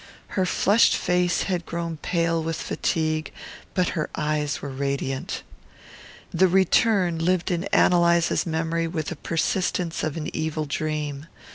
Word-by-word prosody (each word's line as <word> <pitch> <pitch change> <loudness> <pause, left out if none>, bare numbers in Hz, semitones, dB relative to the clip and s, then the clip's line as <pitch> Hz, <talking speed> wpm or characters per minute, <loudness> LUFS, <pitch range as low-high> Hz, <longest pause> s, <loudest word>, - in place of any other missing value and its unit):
Her 185 -2 0
flushed 205 +5 +4
face 180 -1 +1
had 180 -3 -1
grown 170 -1 -3
pale 165 +1 0
with 165 0 -2
fatigue, 155 -1 -1 0.4
but 185 -2 +2
her 155 -4 -2
eyes 150 -1 -1
were 140 - -6
radiant. 135 0 -3 0.9
The 190 - +4
return 190 -1 +3
lived 180 +2 +1
in 175 +1 -1
Ann - - +4
Eliza's 170 0 +3
memory 165 +1 -1
with 160 -2 -3
the 175 - -4
persistence 170 +2 -1
of 155 0 -2
an 160 +1 -5
evil 155 -1 -2
dream. 150 0 -3
165 Hz, 140 wpm, -24 LUFS, 155-180 Hz, 0.9 s, flushed